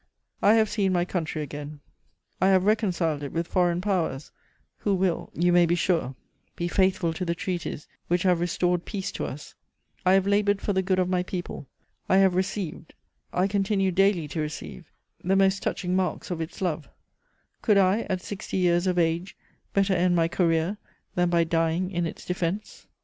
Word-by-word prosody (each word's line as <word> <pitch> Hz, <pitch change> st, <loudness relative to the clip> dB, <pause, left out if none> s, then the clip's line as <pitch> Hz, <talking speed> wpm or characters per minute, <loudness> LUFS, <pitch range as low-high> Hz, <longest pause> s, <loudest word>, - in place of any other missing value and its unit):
"I 210 Hz, +2 st, +6 dB
have 220 Hz, -1 st, +4 dB
seen 195 Hz, -3 st, 0 dB
my 175 Hz, -1 st, +2 dB
country 165 Hz, -4 st, -3 dB
again; 145 Hz, +1 st, -7 dB, 0.6 s
I 190 Hz, -, +5 dB
have 190 Hz, -1 st, +4 dB
reconciled 185 Hz, -8 st, +1 dB
it 140 Hz, -, -5 dB
with 165 Hz, +1 st, -1 dB
foreign 175 Hz, 0 st, +1 dB
Powers, 175 Hz, -8 st, -1 dB, 0.5 s
who 200 Hz, -2 st, 0 dB
will, 185 Hz, -2 st, 0 dB
you 175 Hz, +1 st, +2 dB
may 175 Hz, -1 st, +5 dB
be 170 Hz, -, +2 dB
sure, 165 Hz, -6 st, 0 dB, 0.4 s
be 175 Hz, -, -2 dB
faithful 185 Hz, -2 st, +1 dB
to 170 Hz, -, -4 dB
the 170 Hz, -1 st, -1 dB
treaties 175 Hz, -5 st, -4 dB, 0.2 s
which 175 Hz, 0 st, +1 dB
have 180 Hz, -3 st, +3 dB
restored 175 Hz, 0 st, 0 dB
peace 195 Hz, -3 st, -4 dB
to -, -, -4 dB
us; 145 Hz, +2 st, -8 dB, 0.5 s
I 185 Hz, 0 st, +4 dB
have 195 Hz, 0 st, +4 dB
laboured 205 Hz, 0 st, +2 dB
for 205 Hz, -, -1 dB
the 190 Hz, -, +2 dB
good 185 Hz, 0 st, 0 dB
of 185 Hz, -1 st, +2 dB
my 180 Hz, -1 st, +1 dB
people; 180 Hz, -6 st, -6 dB, 0.4 s
I 190 Hz, -, +5 dB
have 190 Hz, -1 st, +5 dB
received, 185 Hz, -3 st, -3 dB, 0.4 s
I 180 Hz, -, +1 dB
continue 195 Hz, -1 st, +1 dB
daily 190 Hz, -3 st, +2 dB
to 155 Hz, -, -4 dB
receive 150 Hz, 0 st, -7 dB, 0.3 s
the 190 Hz, +2 st, +2 dB
most 195 Hz, 0 st, +3 dB
touching 180 Hz, -1 st, -1 dB
marks 185 Hz, 0 st, -1 dB
of 170 Hz, -2 st, -2 dB
its 165 Hz, +4 st, -5 dB
love; 160 Hz, -4 st, -2 dB, 0.7 s
could 210 Hz, -4 st, +3 dB
I, 195 Hz, +3 st, +3 dB
at 185 Hz, -2 st, -2 dB
sixty 205 Hz, -1 st, -5 dB
years 175 Hz, 0 st, +2 dB
of 180 Hz, -1 st, +1 dB
age, 170 Hz, +2 st, 0 dB, 0.3 s
better 195 Hz, -1 st, +2 dB
end 180 Hz, 0 st, +2 dB
my 165 Hz, -1 st, +3 dB
career 170 Hz, +2 st, +1 dB, 0.4 s
than 175 Hz, 0 st, +2 dB
by 170 Hz, -1 st, +3 dB
dying 165 Hz, +2 st, 0 dB
in 175 Hz, -2 st, -1 dB
its -, -, -9 dB
defense? 180 Hz, +3 st, -3 dB
180 Hz, 185 wpm, -26 LUFS, 170-190 Hz, 0.7 s, I